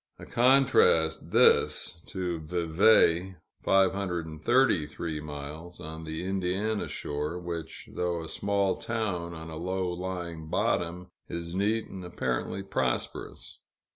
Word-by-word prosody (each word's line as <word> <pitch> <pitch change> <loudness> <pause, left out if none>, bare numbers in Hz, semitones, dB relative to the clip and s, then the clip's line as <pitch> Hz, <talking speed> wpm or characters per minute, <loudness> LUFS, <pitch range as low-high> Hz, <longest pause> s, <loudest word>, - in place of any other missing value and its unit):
A - - -10
contrast 125 -10 +4
this, 85 - +3
to 90 -3 -3
Vevay 85 +2 +3 0.3
(533 90 - +1
miles), 75 +3 -8
on 80 +1 -7
the 80 +3 -4
Indiana 95 +3 -1
shore, 75 +4 -3
which, 85 -2 -6
though 85 -2 -1
a - - -7
small 100 +1 +1
town 90 -7 -2
on 80 0 -8
a 80 - -6
low 95 +2 -1
lying 85 -3 -5
bottom, 90 +2 -1 0.2
is 85 0 -5
neat 105 +4 +1
and 95 -1 -8
apparently 85 +2 -2
prosperous. 95 - -3
90 Hz, 110 wpm, -29 LUFS, 80-95 Hz, 0.3 s, contrast